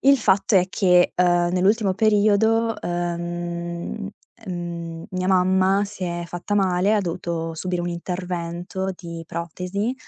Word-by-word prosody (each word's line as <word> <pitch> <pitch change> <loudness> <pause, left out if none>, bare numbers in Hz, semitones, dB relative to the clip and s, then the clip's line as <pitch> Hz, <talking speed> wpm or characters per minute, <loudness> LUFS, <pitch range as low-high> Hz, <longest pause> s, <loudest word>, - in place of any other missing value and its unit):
Il 275 0 +6
fatto 200 -1 +3
è 180 -1 +4
che, 180 -2 +4
uhm, 175 -1 +3
nell'ultimo 195 +2 +2
periodo, 220 +2 +3
uhm, 175 +2 -4 0.4
ehm, 170 -2 -5
mia 185 0 -2
mamma 190 +1 +3
si 200 -1 -9
è 175 -1 -3
fatta 175 +4 -4
male, 190 0 +2
ha 210 - +3
dovuto 165 -2 -3
subire 180 +2 -2
un 175 - -2
intervento 175 +1 -4
di 170 -2 -7
protesi 180 +8 -3
180 Hz, 130 wpm, -23 LUFS, 175-195 Hz, 0.4 s, Il